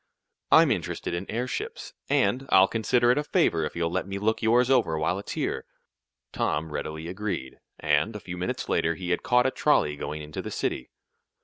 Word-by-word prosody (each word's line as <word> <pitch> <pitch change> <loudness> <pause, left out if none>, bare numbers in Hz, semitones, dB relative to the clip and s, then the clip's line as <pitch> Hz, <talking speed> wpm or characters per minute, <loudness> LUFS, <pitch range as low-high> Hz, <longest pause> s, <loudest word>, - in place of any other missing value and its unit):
"I'm - - +7
interested - - -2
in 85 +3 -4
airships, 275 - -4 0.2
and, 135 -1 +1
I'll 95 0 +6
consider 120 +3 +2
it 125 - +2
a - - -1
favor 145 - +1
if - - -6
you'll 85 -1 -1
let 95 +2 -2
me 100 0 -4
look 110 +3 0
yours 120 +2 +4
over 120 -12 +2
while 80 +5 0
it's 100 - -6
here." - - -2 0.7
Tom 80 +1 -1
readily 80 +2 -4
agreed, 95 -8 -4 0.2
and 75 +8 +1
a - - -4
few 90 -2 -7
minutes 90 +1 -3
later 85 0 +1
he 90 +1 -4
had 90 - +1
caught 125 0 +3
a 130 - +2
trolley 75 - +2
going 75 +1 -5
into 75 0 -6
the - - -6
city. 65 - -3
95 Hz, 195 wpm, -26 LUFS, 80-125 Hz, 0.7 s, I'm